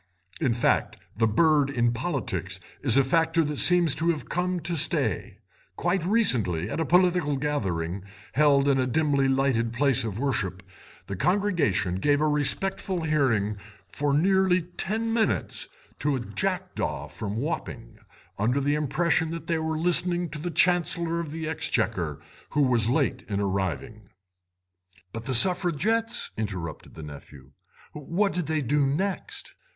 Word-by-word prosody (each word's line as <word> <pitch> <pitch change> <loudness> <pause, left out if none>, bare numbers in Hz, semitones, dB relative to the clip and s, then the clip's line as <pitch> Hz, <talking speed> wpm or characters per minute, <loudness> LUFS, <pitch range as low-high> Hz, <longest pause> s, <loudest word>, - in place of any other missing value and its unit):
In 140 -7 +1
fact, 120 - 0 0.2
the 115 +2 +2
bird 150 +4 +3
in 120 -3 +1
politics 95 - -3 0.2
is 130 -3 +3
a 135 - +5
factor 165 +4 +2
that 150 -1 -3
seems 175 -4 +5
to 165 +3 -1
have 155 -6 -2
come 180 0 -1
to 170 +2 -2
stay; 155 - 0 0.4
quite 190 -3 0
recently, 115 - +1
at - - -3
a 165 - 0
political 180 -5 +2
gathering 95 - -2 0.3
held 140 0 +4
in 135 -1 +3
a 130 - +1
dimly 140 0 +1
lighted 130 -4 +1
place 135 0 +2
of 110 -3 -4
worship, 95 -9 -2 0.4
the 100 - -5
congregation 170 - 0
gave 145 +7 +2
a 155 - +2
respectful 170 +5 -1
hearing 115 -10 +1 0.3
for 145 0 -2
nearly 185 +3 +3
ten 215 +6 -3
minutes 225 -1 -1 0.3
to 145 -1 0
a - - -2
jackdaw 185 +8 -3
from 105 -1 -6
Wapping, 130 - -5 0.4
under 120 +7 +1
the 145 +1 0
impression 160 +2 0
that 165 0 -6
they 165 -1 -1
were 160 0 -2
listening 175 +1 +2
to 150 - -7
the 175 +4 -4
Chancellor 170 -1 +1
of 170 -3 -4
the 160 +1 -5
Exchequer, 160 - -1 0.3
who 145 - +1
was 120 -4 +2
late 135 -1 0
in 100 -1 -1
arriving." 95 - -3 1.0
"But 115 0 -6
the 130 -1 +3
Suffragettes," 190 - +3
interrupted 95 -7 -5
the 80 - -9
nephew; 70 -2 -12 0.4
"what 170 +7 -1
did 175 -3 -2
they 155 -2 0
do 145 +4 +1
next?" 190 +8 -3
145 Hz, 150 wpm, -26 LUFS, 115-170 Hz, 1.0 s, a